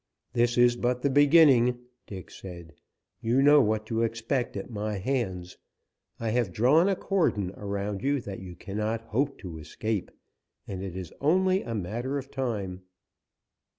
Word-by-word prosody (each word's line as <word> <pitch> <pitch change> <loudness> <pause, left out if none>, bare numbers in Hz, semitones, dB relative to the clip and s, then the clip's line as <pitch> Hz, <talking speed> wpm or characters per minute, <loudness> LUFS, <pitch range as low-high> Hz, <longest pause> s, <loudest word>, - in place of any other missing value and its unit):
"This 120 0 +2
is 120 0 +5
but 125 +1 -1
the 140 - +2
beginning," 140 -4 +6 0.3
Dick 95 -3 -9
said. 85 -4 -10 0.5
"You 120 +4 +2
know 145 0 +7
what 110 -2 0
to 115 0 -1
expect 115 +1 -1
at 95 - -5
my 105 -1 -3
hands. 95 -6 -3 0.6
I 115 -1 -1
have 120 -5 +1
drawn 145 - +4
a 195 - +2
cordon 160 - 0
around 100 0 -3
you 140 +1 +1
that 100 -4 -7
you 90 -2 -9
cannot 105 +5 -3
hope 135 +5 -1
to 85 -6 -7
escape, 100 +6 -3 0.6
and 95 -2 -5
it 95 -2 -6
is 90 -3 -7
only 185 +5 +3
a 115 - -5
matter 120 +8 -3
of 135 0 -7
time." 105 -8 -3
115 Hz, 155 wpm, -27 LUFS, 100-135 Hz, 0.6 s, know